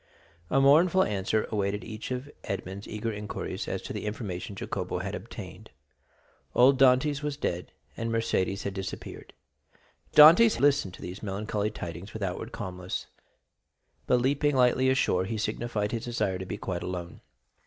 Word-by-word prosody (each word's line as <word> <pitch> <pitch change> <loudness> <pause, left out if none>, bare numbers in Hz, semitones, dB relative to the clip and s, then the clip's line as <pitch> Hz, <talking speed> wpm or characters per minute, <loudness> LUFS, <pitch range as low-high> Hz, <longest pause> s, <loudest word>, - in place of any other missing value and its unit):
A 135 - +3
mournful 165 +7 +5
answer 105 +2 0
awaited 100 -1 -1
each 110 0 -7
of 130 +2 -3 0.2
Edmond's 100 +1 -5
eager 110 +1 -3
inquiries 105 0 -5
as - - -3
to - - -6
the - - -4
information 100 -3 -5
Jacopo - - -3
had - - -4
obtained. - - -8 0.9
Old 130 +2 +6
Dantès 135 +2 +4
was 145 -1 -3
dead, 90 -10 -3 0.2
and 115 0 -3
Mercédès 105 -4 0
had 100 - -3
disappeared. 95 -1 -7 0.8
Dantès 170 +10 +8
listened 140 -10 +2
to - - -12
these 90 +1 -7
melancholy 105 +1 -2
tidings 85 +1 -7
with 110 - -4
outward 90 -2 -3
calmness; 90 -2 -5 1.0
but, 125 - +4
leaping 140 +3 +1
lightly 130 +1 +4
ashore, 95 -8 +2
he 110 +3 -3
signified 110 0 -2
his 115 -1 -3
desire 105 -6 -1
to 95 - -6
be - - -4
quite 90 -2 -4
alone. 90 -1 -5
110 Hz, 155 wpm, -28 LUFS, 95-130 Hz, 1.0 s, Dantès